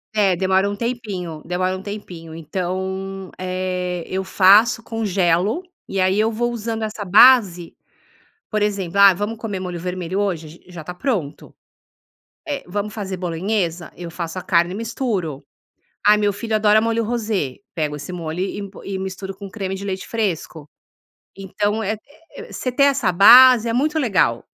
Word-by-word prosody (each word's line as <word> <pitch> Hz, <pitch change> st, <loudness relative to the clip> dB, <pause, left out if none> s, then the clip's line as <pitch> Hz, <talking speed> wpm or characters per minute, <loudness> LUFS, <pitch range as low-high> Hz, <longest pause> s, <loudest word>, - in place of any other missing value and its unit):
É, 200 Hz, -4 st, +3 dB
demora 190 Hz, +2 st, +2 dB
um 205 Hz, -, -3 dB
tempinho 205 Hz, -9 st, -4 dB
demora 185 Hz, +1 st, -1 dB
um -, -, -9 dB
tempinho, 180 Hz, -6 st, -8 dB
então, 190 Hz, +3 st, -4 dB
eh, 185 Hz, -1 st, -3 dB
eu 190 Hz, +1 st, -2 dB
faço, 200 Hz, +5 st, +5 dB
congelo 205 Hz, -, 0 dB, 0.2 s
e 195 Hz, -, -3 dB
aí 185 Hz, +2 st, +2 dB
eu 220 Hz, +1 st, +2 dB
vou 240 Hz, +2 st, -1 dB
usando 225 Hz, -1 st, -4 dB
essa 215 Hz, -1 st, -4 dB
base, 200 Hz, -4 st, +5 dB, 0.7 s
por 215 Hz, -1 st, -1 dB
exemplo, 200 Hz, -3 st, -1 dB
ah, 200 Hz, -1 st, +8 dB
vamos 205 Hz, +5 st, -4 dB
comer 215 Hz, -4 st, -4 dB
molho 180 Hz, -2 st, -5 dB
vermelho 180 Hz, +1 st, -3 dB
hoje 175 Hz, -6 st, -2 dB
j 165 Hz, -, -16 dB
já 175 Hz, -2 st, -8 dB
está 180 Hz, +3 st, -7 dB
pronto, 180 Hz, -, -3 dB, 0.9 s
eh, 285 Hz, -3 st, -4 dB
vamos 205 Hz, +3 st, -3 dB
fazer 195 Hz, -3 st, -4 dB
bolonhesa, 175 Hz, 0 st, -2 dB
eu 175 Hz, -1 st, -7 dB
faço 170 Hz, +1 st, -5 dB
a -, -, -5 dB
carne 170 Hz, 0 st, +2 dB
e -, -, -5 dB
misturo. 220 Hz, -, -3 dB, 0.6 s
Ai, 210 Hz, +1 st, +6 dB
meu 205 Hz, -1 st, +1 dB
filho 220 Hz, +2 st, -3 dB
adora 215 Hz, 0 st, +4 dB
molho 230 Hz, 0 st, 0 dB
rosé, 215 Hz, -, -2 dB, 0.2 s
pego 150 Hz, -3 st, -2 dB
esse 145 Hz, +5 st, -8 dB
molho 165 Hz, -1 st, -5 dB
e 200 Hz, +1 st, -3 dB
po 195 Hz, -, -13 dB
e 195 Hz, -1 st, -4 dB
misturo 190 Hz, 0 st, -6 dB
com 200 Hz, 0 st, -9 dB
creme 195 Hz, -2 st, -4 dB
de 195 Hz, -, -7 dB
leite 190 Hz, -1 st, -4 dB
fresco. 170 Hz, -8 st, -3 dB, 0.7 s
Então 205 Hz, +3 st, -2 dB
eh 215 Hz, +1 st, -1 dB, 0.4 s
eh 480 Hz, -1 st, -10 dB
você 255 Hz, -, -3 dB
ter 280 Hz, +3 st, +3 dB
essa 275 Hz, -8 st, +2 dB
base, 240 Hz, +5 st, +8 dB
é -, -, 0 dB
muito 300 Hz, +6 st, +1 dB
legal. 190 Hz, -, +1 dB
195 Hz, 170 wpm, -21 LUFS, 180-220 Hz, 0.9 s, ah